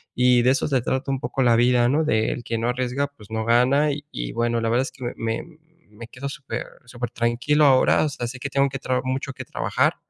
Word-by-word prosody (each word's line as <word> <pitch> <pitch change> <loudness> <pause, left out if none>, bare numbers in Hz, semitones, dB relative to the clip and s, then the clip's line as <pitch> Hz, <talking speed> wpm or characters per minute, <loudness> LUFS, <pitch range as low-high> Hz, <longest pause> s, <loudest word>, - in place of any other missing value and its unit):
y 125 -1 +4
de 125 - +4
eso 135 - 0
se 135 -4 +1
trata 130 +2 -2
un 135 - -1
poco 135 -2 -1
la 120 -2 +4
vida, 120 0 +4
¿no?, 150 +4 +2
de 110 -6 +1
el 120 - -5
que 115 0 -3
no 115 +2 -1
arriesga, 130 +3 -1
pues 110 -8 -18
no 110 0 -2
gana. 130 +6 +3
Y 145 +1 -5
y - - -4
bueno, 120 0 0
la 115 - 0
verdad 120 +3 +2
es - - -6
que 130 - -12
me 120 - -3
me 115 0 -3 0.5
me 110 +2 -10
quedo 130 +3 -7
super 140 -1 -5 0.2
supertranquilo 120 +4 0
ahora. 135 +2 +4
O - - 0
sea, 120 - -5
sé 130 +2 -8
que 140 +2 -4
tengo 140 0 +2
que 135 0 -5
traba 130 -1 -1
mucho 130 +1 -3
que - - -8
trabajar, - - 0
125 Hz, 250 wpm, -23 LUFS, 120-135 Hz, 0.5 s, y